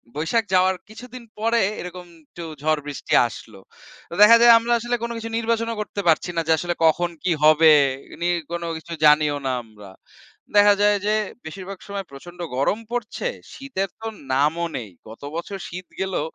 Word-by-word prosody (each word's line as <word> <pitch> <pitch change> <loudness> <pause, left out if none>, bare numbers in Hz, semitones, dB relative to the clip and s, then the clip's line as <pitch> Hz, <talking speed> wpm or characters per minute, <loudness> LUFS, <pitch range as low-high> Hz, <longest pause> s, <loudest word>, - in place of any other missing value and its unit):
বৈশাখ 165 +10 0
যাওয়ার 185 0 +4
কিছুদিন 250 +2 -11 0.2
পরে 230 +1 +2 0.2
এরকম 180 0 -8 0.2
একটু 170 - -10 0.2
ঝড় 155 0 +1
বৃষ্টি 145 - -5
আসলো। 110 -3 -12 0.5
তো - - -10
দেখা 220 +3 +9
যায় 235 0 +9
আমরা 235 +1 0
আসলে 240 +1 -2
কোনো 235 0 -3
কিছু 225 0 -6
নির্বাচনও 230 -1 -1
করতে 205 -1 -4
পারছি 165 +2 +3
না 165 - +1
যে - - +2
আসলে 175 +1 -2
কখন 175 +2 +2
কি 185 - +1
হবে? 155 +1 +7 0.4
এ - - -9
নিয়ে 175 0 +1 0.2
কোনো 170 0 -3
কিছু 165 +1 -9
জানিও 150 -1 +4
না 130 - 0
আমরা। 105 -3 -15 0.6
দেখা 205 0 +7
যায় 205 0 +4
যে 210 +1 +2 0.3
বেশিরভাগ 185 +4 -8
সময় 200 -1 -5
প্রচন্ড 175 +6 -12 0.2
গরম 140 - +1
পড়ছে, 245 - -3 0.3
শীতের 255 -9 -4
তো 225 - -4 0.3
নামও 150 +5 +1
নেই। 115 -4 -7 0.2
গত 110 - -12
বছর 175 +4 -5
শীত 180 +1 -8
গেলো 190 -3 -1
180 Hz, 175 wpm, -22 LUFS, 155-220 Hz, 0.6 s, দেখা